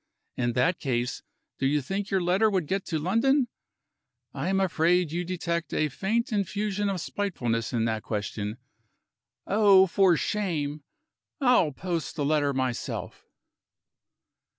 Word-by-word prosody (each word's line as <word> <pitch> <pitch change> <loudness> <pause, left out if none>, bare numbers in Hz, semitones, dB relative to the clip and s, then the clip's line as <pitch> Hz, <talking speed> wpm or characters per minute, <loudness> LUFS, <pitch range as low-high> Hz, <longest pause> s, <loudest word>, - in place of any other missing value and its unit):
In 120 -1 0
that 165 +8 +1
case, 125 -2 -2 0.4
do 135 - +2
you 150 +2 +2
think 195 +9 -3
your 190 -2 +1
letter 190 +5 +3
would 190 -5 0
get 195 +5 -2
to 160 - -1
London? 235 - +2 0.8
I - - -2
am 195 0 +2
afraid 175 -2 +2
you 175 +2 -1
detect 170 -2 -3
a 155 - +1
faint 220 - -1
infusion 205 0 -1
of 190 -2 -2
spitefulness 120 - -2
in 115 -2 0
that 110 -1 -1
question. 105 -1 -4 0.9
Oh, 200 -2 +6
for 185 -2 +3
shame! 155 -9 -2 0.6
I'll 250 - +4
post 170 +3 -4
the 145 -4 -1
letter 145 -1 +2
myself." 130 -3 -3
175 Hz, 135 wpm, -27 LUFS, 140-195 Hz, 0.9 s, Oh